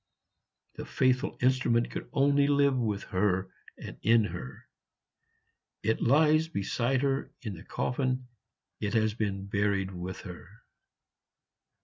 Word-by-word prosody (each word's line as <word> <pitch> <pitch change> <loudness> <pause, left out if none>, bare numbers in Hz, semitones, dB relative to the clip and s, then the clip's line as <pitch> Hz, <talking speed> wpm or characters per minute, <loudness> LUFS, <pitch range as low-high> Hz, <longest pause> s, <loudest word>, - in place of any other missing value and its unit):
The - - -5
faithful 130 +2 +1
instrument 125 -2 +2
could - - -6
only 140 0 +3
live 140 -1 +3
with 110 -5 -1
her 95 -1 +1 0.3
and - - -9
in 115 0 +4
her; 65 -10 -7 1.2
it 110 +1 0
lies 155 +4 +4
beside 125 0 -1
her 135 0 0
in 110 -4 -4
the 85 0 -10
coffin, 130 +2 -2 0.5
it 105 +2 -2
has 110 -1 +2
been 100 -3 -3
buried 100 -1 0
with 90 0 -6
her." 95 +2 -12
115 Hz, 120 wpm, -29 LUFS, 100-135 Hz, 1.2 s, in